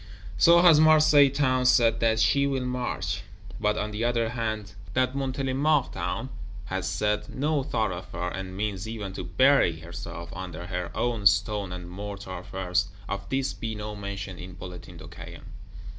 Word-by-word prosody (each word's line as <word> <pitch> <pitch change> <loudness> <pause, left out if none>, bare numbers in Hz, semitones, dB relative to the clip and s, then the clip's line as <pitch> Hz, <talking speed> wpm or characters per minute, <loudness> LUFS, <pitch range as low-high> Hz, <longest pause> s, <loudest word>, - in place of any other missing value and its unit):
So 170 - +6
has 165 -4 +8
Marseilles 155 -3 +6
Town 130 -3 +2
said 120 -3 +4
that 110 -1 +2
she 140 +4 +3
will 135 -2 -1
march. 125 -1 -2 0.4
But 105 0 +1
on 105 +1 -2
the 105 +2 -3
other 120 -1 +1
hand, 110 -3 -3 0.2
that 130 0 +2
Montélimart 135 +1 0
Town 130 - -3 0.4
has 95 -1 -3
said, 105 +2 -1
No 150 +1 0
thoroughfare; 95 - -2
and 95 0 -6
means 105 -1 -3
even 105 -4 -5
to 95 - -5
"bury 90 - +3
herself" 85 0 -8
under 90 -2 -6
her 90 -1 -3
own 115 -4 +2
stone 100 +1 +1
and 90 -1 -6
mortar 100 -1 -7
first, 90 +1 -1 0.2
of 100 - -5
this 135 0 0
be 110 -1 -5
no 105 0 -5
mention 100 -2 -6
in 90 +1 -8
Bulletin 90 0 -10
de 80 0 -10
Caen. 85 0 -10
105 Hz, 160 wpm, -27 LUFS, 95-130 Hz, 0.4 s, has